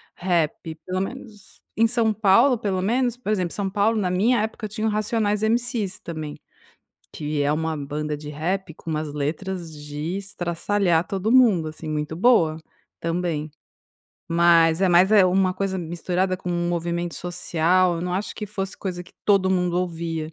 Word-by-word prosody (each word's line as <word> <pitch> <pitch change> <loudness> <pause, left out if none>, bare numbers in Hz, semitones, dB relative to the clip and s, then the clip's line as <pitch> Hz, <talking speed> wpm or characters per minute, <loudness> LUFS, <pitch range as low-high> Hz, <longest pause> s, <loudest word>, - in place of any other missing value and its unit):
rap 165 -3 -1
pelo 185 0 -2
menos, 210 -2 -8
em 230 +1 +4
São 225 -2 +1
Paulo 230 +5 +4
pelo 195 -4 -1
menos, 245 +4 +1
por 215 -4 -3
exemplo 180 -5 -1
São 200 -2 -2
Paulo 210 +3 +1
na 185 -3 0
minha 210 +5 +2
época 220 0 -4
eu - - -5
tinha 215 +2 -2
o - - +2
Racionais 210 0 0
MC's 230 -3 0
também, 155 -3 -6 0.7
que 150 -1 -3
é 145 - +2
uma 160 0 -1
banda 150 +1 -3
de 150 0 -8
rap 165 +4 -3
com 165 - -10
umas 155 -2 -3
letras 170 +4 -3
de 150 +4 -5
estraçalhar 180 -1 0
todo 195 +3 -1
mundo, 225 -11 +5
assim, 155 +1 -8
muito 150 +1 -3
boa, 175 -6 +4 0.4
também. 165 -3 -2 0.8
Mas 165 -1 +4
é 190 - +4
mais, 180 +3 +5
é 205 -3 +7
uma 185 0 +2
coisa 190 0 -2
misturada 180 +2 -1
com 180 -1 -5
um 175 0 -1
movimento 170 0 -2
social, 175 +1 +1
eu - - -4
não 180 +1 -3
acho 195 +3 -3
que 210 - -5
fosse 195 -2 -5
coisa 185 -3 -4
que 175 - -19
todo 195 -2 +4
mundo 180 -2 +1
ouvia. 165 -3 -3
180 Hz, 175 wpm, -23 LUFS, 165-205 Hz, 0.8 s, é